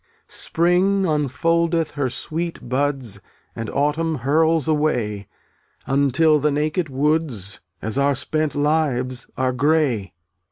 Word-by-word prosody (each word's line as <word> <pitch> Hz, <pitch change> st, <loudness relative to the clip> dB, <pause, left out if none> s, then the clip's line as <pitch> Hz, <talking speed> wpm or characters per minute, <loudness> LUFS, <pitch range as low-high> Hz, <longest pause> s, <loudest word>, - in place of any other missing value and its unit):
0un<j -, -, -47 dB
(ftttt -, -, -38 dB
At* -, -, -21 dB
Spring 180 Hz, +4 st, +2 dB
unfoldeth 165 Hz, +2 st, +1 dB
her 140 Hz, -3 st, -1 dB
sweet 165 Hz, +5 st, -4 dB
buds 130 Hz, -4 st, -1 dB
rl -, -, -20 dB, 0.3 s
And 115 Hz, -1 st, -4 dB
autumn 155 Hz, +3 st, 0 dB
hurls 155 Hz, +4 st, +2 dB
away, 125 Hz, -, 0 dB, 0.6 s
(jvC' 135 Hz, -, -2 dB
Until 145 Hz, +3 st, +3 dB
the 150 Hz, +2 st, +2 dB
naked 155 Hz, +3 st, -1 dB
woods, 135 Hz, -, -1 dB, 0.2 s
As 110 Hz, +5 st, -1 dB
our 140 Hz, 0 st, +3 dB
spent 155 Hz, +3 st, -1 dB
lives, 140 Hz, -4 st, 0 dB
are 130 Hz, 0 st, +1 dB
gray. 130 Hz, -, +1 dB
145 Hz, 135 wpm, -22 LUFS, 130-160 Hz, 0.6 s, Until